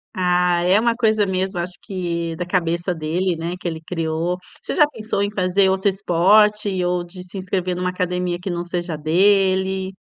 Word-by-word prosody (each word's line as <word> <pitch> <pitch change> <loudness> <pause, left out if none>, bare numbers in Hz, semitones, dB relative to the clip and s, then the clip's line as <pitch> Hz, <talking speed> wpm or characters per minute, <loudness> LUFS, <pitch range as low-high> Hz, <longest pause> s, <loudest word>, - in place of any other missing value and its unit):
Ah, 180 -1 +2
é 185 +3 +5
uma 235 +1 +1
coisa 220 -3 +2
mesmo 190 -1 -1
acho 175 +1 -3
que 170 -4 -3
da 180 - -4
cabeça 175 0 -1
dele, 170 +3 -1
né, 170 +2 -3
que 180 - -5
ele 160 -1 -3
criou. 165 +1 -2 0.2
Você - - -4
já 300 -3 +5
pensou 220 -6 -3
em 200 0 0
fazer 190 0 +2
outro 190 +1 +1
esporte 200 +1 +3
ou 175 0 0
de 180 +1 -9
se 185 +2 -10
inscrever 185 -1 -2
numa 180 +1 -1
academia 180 -1 -2
que 190 - -4
não 175 -1 -2
seja 175 -1 -3
a - - -7
dele? 190 +3 +2
180 Hz, 190 wpm, -21 LUFS, 175-195 Hz, 0.2 s, é